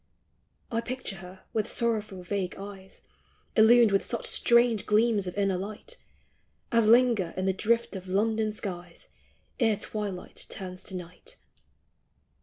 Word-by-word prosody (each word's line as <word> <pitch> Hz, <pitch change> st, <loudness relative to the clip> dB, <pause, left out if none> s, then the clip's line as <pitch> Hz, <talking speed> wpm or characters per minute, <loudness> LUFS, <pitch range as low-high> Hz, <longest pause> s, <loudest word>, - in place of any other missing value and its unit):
I 230 Hz, 0 st, 0 dB
picture 240 Hz, -4 st, -5 dB
her 185 Hz, +1 st, -12 dB
with 220 Hz, 0 st, -1 dB
sorrowful 215 Hz, -5 st, -1 dB
vague 185 Hz, 0 st, -3 dB
eyes 195 Hz, -1 st, -10 dB, 0.5 s
Illumed 225 Hz, 0 st, +6 dB
with 195 Hz, -, +2 dB
such 235 Hz, -, -4 dB
strange 235 Hz, -3 st, +3 dB
gleams 215 Hz, -2 st, +3 dB
of 180 Hz, -, -6 dB
inner 195 Hz, -2 st, +1 dB
light 215 Hz, -, -7 dB, 0.7 s
As 230 Hz, -2 st, +3 dB
linger 230 Hz, -6 st, +4 dB
in 185 Hz, -, -1 dB
the 190 Hz, -, +2 dB
drift 230 Hz, +3 st, 0 dB
of 190 Hz, -1 st, -7 dB
London 215 Hz, +3 st, +1 dB
skies 180 Hz, -4 st, -8 dB, 0.5 s
Ere 225 Hz, -4 st, +3 dB
twilight 205 Hz, -3 st, -5 dB
turns 185 Hz, -1 st, -7 dB
to 190 Hz, -, -5 dB
night. 180 Hz, -1 st, -10 dB
210 Hz, 135 wpm, -28 LUFS, 190-230 Hz, 0.7 s, Illumed